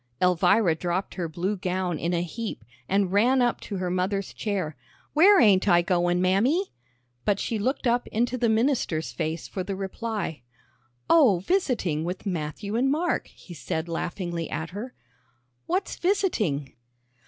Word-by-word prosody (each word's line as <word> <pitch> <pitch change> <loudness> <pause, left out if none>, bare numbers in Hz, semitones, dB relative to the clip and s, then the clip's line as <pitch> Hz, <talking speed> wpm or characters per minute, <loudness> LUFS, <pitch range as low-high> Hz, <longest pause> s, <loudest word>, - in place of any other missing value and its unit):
Elvira 180 +1 +4
dropped 175 +3 -2
her 175 -3 -3
blue 180 +6 -2
gown 180 -3 -2
in 170 - -1
a 175 -1 0
heap, 180 - -6 0.2
and 195 -1 +2
ran 240 +7 +4
up 245 -1 +1
to 200 - -5
her 180 -1 -2
mother's 185 +2 -1
chair. 190 -8 -2 0.4
"Where 380 +6 +7
ain't 200 - +5
I 175 -2 +5
goin', 175 0 +1
Mammy?" 235 - +2 0.5
but 200 +4 +1
she 225 - -2
looked 260 +6 -1
up 245 0 +1
into 240 +3 0
the 240 -2 +1
minister's 220 - +1
face 160 0 -3
for 185 - -4
the 195 +1 -4
reply. 195 - -4 0.7
"Oh, 270 - +6
visiting 235 - 0
with 180 +4 -5
Matthew 185 +3 -3
and 255 +3 +2
Mark," 320 +5 0
he 175 - -13
said 160 +1 -3
laughingly 170 0 -3
at 160 +3 -4
her. 220 +7 -7 0.7
"What's 370 +3 -1
visiting?" 215 - 0
195 Hz, 155 wpm, -26 LUFS, 175-235 Hz, 0.7 s, Where